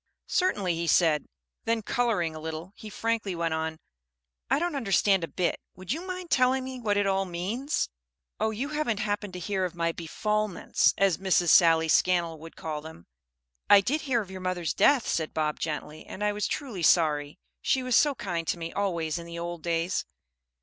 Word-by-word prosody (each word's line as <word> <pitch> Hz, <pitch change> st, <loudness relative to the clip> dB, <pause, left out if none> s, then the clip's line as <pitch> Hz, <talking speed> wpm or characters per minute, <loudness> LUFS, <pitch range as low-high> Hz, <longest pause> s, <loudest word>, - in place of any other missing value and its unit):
"Certainly," 205 Hz, -, +1 dB
he 170 Hz, 0 st, -2 dB
said. 160 Hz, -3 st, +3 dB, 0.4 s
Then 225 Hz, -1 st, 0 dB
coloring 205 Hz, -9 st, 0 dB
a -, -, -6 dB
little 160 Hz, +3 st, -6 dB
he 215 Hz, -, -10 dB
frankly 225 Hz, -3 st, -2 dB
went 165 Hz, -1 st, -1 dB
on, 160 Hz, 0 st, -2 dB, 0.7 s
"I 270 Hz, -, +3 dB
don't 340 Hz, 0 st, -1 dB
understand 195 Hz, -6 st, +2 dB
a -, -, -2 dB
bit. 180 Hz, +1 st, -1 dB, 0.2 s
Would 185 Hz, +2 st, -7 dB
you 325 Hz, -, -4 dB
mind 365 Hz, -2 st, -6 dB
telling 255 Hz, 0 st, +3 dB
me 260 Hz, -1 st, -6 dB
what 210 Hz, -3 st, 0 dB
it 205 Hz, -, +2 dB
all 195 Hz, 0 st, +2 dB
means?" 200 Hz, -, -2 dB, 0.5 s
"Oh, 220 Hz, -, +1 dB
you 235 Hz, +6 st, -3 dB
haven't 300 Hz, -9 st, -1 dB
happened 205 Hz, -2 st, -2 dB
to 180 Hz, -, -5 dB
hear 190 Hz, +1 st, -1 dB
of 180 Hz, -1 st, -3 dB
my 170 Hz, -1 st, 0 dB
'befalments,' 210 Hz, +5 st, 0 dB
as 195 Hz, -4 st, +2 dB
Miss 190 Hz, -1 st, +2 dB
Sally 165 Hz, -2 st, +6 dB
Scannell 170 Hz, -1 st, +2 dB
would 165 Hz, +1 st, -11 dB
call 155 Hz, -2 st, -4 dB
them." 155 Hz, -, -11 dB, 0.6 s
"I 205 Hz, -, +9 dB
did 280 Hz, +10 st, 0 dB
hear 250 Hz, -5 st, +1 dB
of 195 Hz, -3 st, -9 dB
your 190 Hz, -1 st, -7 dB
mother's 185 Hz, -2 st, -1 dB
death," 280 Hz, -5 st, +4 dB
said 160 Hz, -2 st, -1 dB
Bob, 155 Hz, -1 st, -1 dB
gently, 155 Hz, -1 st, -4 dB
"and 205 Hz, -, -6 dB
I 210 Hz, -, +2 dB
was 205 Hz, 0 st, -1 dB
truly 245 Hz, -, -4 dB
sorry. 150 Hz, -3 st, +3 dB, 0.2 s
She 260 Hz, -, +1 dB
was 255 Hz, -2 st, +1 dB
so 290 Hz, +1 st, +4 dB
kind 175 Hz, -8 st, -3 dB
to -, -, 0 dB
me 165 Hz, 0 st, -6 dB
always 170 Hz, -5 st, -1 dB
in 170 Hz, -, -9 dB
the 170 Hz, 0 st, -7 dB
old 170 Hz, 0 st, -5 dB
days." 170 Hz, +2 st, -1 dB
185 Hz, 195 wpm, -27 LUFS, 165-225 Hz, 0.7 s, I